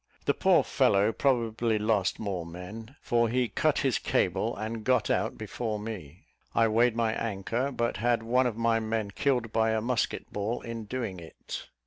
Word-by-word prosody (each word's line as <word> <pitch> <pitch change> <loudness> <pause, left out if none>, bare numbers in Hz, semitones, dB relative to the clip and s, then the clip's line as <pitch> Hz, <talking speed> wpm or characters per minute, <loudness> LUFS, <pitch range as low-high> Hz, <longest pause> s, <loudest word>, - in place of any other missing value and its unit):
The - - +3
poor - - +4
fellow 100 +3 +3
probably 115 -2 +1
lost 105 -3 +1
more 95 -5 -3
men, 95 +9 -9
for 120 -1 +2
he 125 +1 +1
cut - - +1
his - - +1
cable, - - 0
and 110 +1 -4
got 125 -1 +2
out - - 0
before 110 +1 -3
me. 95 -7 -7 0.3
I 115 - +5
weighed 115 +2 +3
my 115 -1 +1
anchor, 115 +5 -2
but 120 -3 -1
had 120 -1 +1
one 125 +3 +3
of 115 -3 -3
my 115 -1 +2
men 110 -2 -2
killed 125 0 0
by 110 0 +2
a 110 - +1
musket 120 +2 -2
ball 105 +4 -2
in 115 -2 -6
doing 110 -5 -4
it. 80 -1 -8
115 Hz, 175 wpm, -28 LUFS, 105-120 Hz, 0.3 s, I